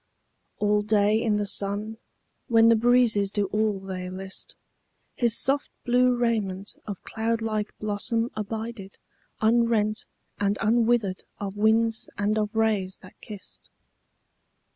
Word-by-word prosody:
All 210 0 +2
day 210 +1 +2
in 220 -3 +1
the 205 - -1
sun, 205 +2 -1 0.5
when 230 -1 +5
the 230 - +6
breezes 230 -3 +3
do 205 0 0
all 215 -1 +1
they 185 -1 -6
list, 190 +1 -7 0.6
His 235 -2 +2
soft 275 +2 0 0.2
blue 250 0 +3
raiment 210 -5 -1
of 200 -3 -6
cloudlike 225 -1 -2
blossom 220 +3 0
abided 215 -1 -6 0.5
Unrent 220 -2 +2 0.3
and 200 0 +1
unwithered 225 -3 +2 0.2
of 200 -1 -5
winds 220 +1 +2
and 210 +2 +1
of 210 +1 -2
rays 210 -4 0
that 185 - -16
kissed. 205 -3 -12
215 Hz, 120 wpm, -26 LUFS, 205-230 Hz, 0.6 s, the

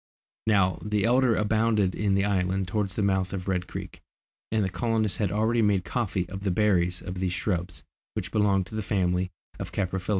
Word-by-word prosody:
Now, 95 -4 +3
the 105 -1 0
elder 125 0 +4
abounded 105 -2 +2
in 100 -2 +1
the 100 0 +2
island 95 -1 0
towards 100 -1 -1
the 105 - 0
mouth 95 -1 +1
of 95 -1 -4
Red 90 -1 -1
Creek, - - -7 0.5
and 110 -1 +2
the - - -1
colonists 110 0 0
had 100 -4 +1
already 110 +3 +2
made 100 -4 +2
coffee 100 -7 -1
of 95 +2 -7
the 100 - 0
berries 90 -2 +2
of 90 0 -5
these 90 -1 0
shrubs, 90 -6 -2 0.3
which - - -3
belong 100 -3 +3
to 90 - -14
the 110 - -2
family 90 -3 0 0.3
of - - -5
the - - -12
caprifoliaceæ. 95 -1 -2
100 Hz, 200 wpm, -27 LUFS, 90-105 Hz, 0.5 s, elder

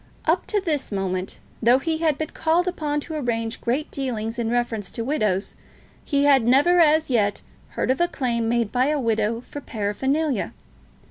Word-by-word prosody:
Up - - +1
to 420 - +1
this 315 - -2
moment, 190 -2 -2 0.2
though 240 +2 +5
he 320 +3 -2
had 315 -3 +1
been 315 - -4
called 335 +3 +1
upon 295 -4 -1
to 320 - -7
arrange 230 -6 -2
great 265 +6 -1
dealings 235 -4 -3
in 230 -1 -1
reference 235 -4 -1
to 230 - -4
widows, 215 -8 0 0.5
he 280 -2 +1
had 270 -5 +4
never 290 +8 +5
as 315 -2 +4
yet 205 -4 +1 0.3
heard - - +1
of 260 - 0
a 345 - +4
claim 235 -7 -1
made 235 -3 0
by 255 +2 +2
a 300 0 +1
widow 225 -1 0
for 290 +3 -9
paraphernalia. 265 +5 -1
255 Hz, 180 wpm, -23 LUFS, 225-300 Hz, 0.5 s, though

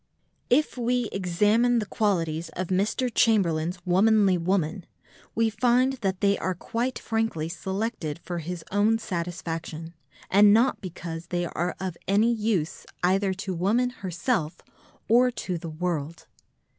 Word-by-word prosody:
If 265 0 +2
we 245 -1 0
examine 210 +6 +2
the 220 - 0
qualities 170 -6 -1
of 185 -1 -4
Mr. 200 +7 +1
Chamberlain's 180 -7 +2
womanly 195 +1 +4
woman, 175 0 -1 0.5
we 225 -1 +2
find 250 +3 +2
that 190 -2 -1
they 200 -1 +3
are 185 0 -1
quite 235 +8 -2
frankly 225 -9 -1
selected 190 -2 -3
for 175 0 -5
his 170 +1 -6
own 210 +3 +3
satisfaction, 170 -4 -5 0.3
and 205 +1 +6
not 230 +5 +3
because 170 -2 -7
they 175 -1 -1
are 175 +1 -2
of 185 -2 -4
any 215 +5 +3
use 210 -7 -1 0.2
either 190 +2 +2
to 190 - -2
woman 220 +8 +1
herself 180 -5 -2 0.5
or 245 +3 +5
to 185 -7 -4
the 165 - -6
world. 160 -1 -3
190 Hz, 135 wpm, -26 LUFS, 170-225 Hz, 0.5 s, and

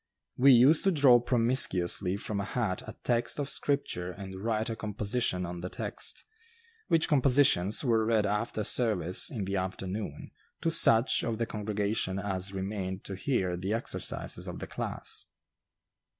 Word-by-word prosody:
We 135 +2 +6
used 130 +6 +6
to 195 - +4
draw 140 -7 +6
promiscuously 115 -7 +2
from 100 0 -3
a - - -1
hat 105 -3 -2
a - - -8
text 120 -1 0
of 145 -1 -3
scripture 140 -11 -2
and 95 +1 -9
write 110 0 -1
a 115 - -3
composition 105 -3 -2
on 85 0 -6
the 90 +2 -5
text, - - -4 0.6
which 165 -1 +3
compositions 135 - +3
were 115 -3 +2
read 110 -1 +2
after 105 +2 -2
service 95 -7 +1
in 110 -8 -4
the 100 +1 -2
afternoon, 95 -2 -5 0.3
to 165 - 0
such 115 -7 +4
of 115 -1 -2
the 115 - -1
congregation 105 -2 -2
as 95 -1 -2
remained 95 -1 -4
to 95 - -6
hear 95 -5 -1
the 95 +4 -3
exercises 115 - -4
of - - -6
the - - -6
class. - - -4
105 Hz, 155 wpm, -29 LUFS, 95-120 Hz, 0.6 s, We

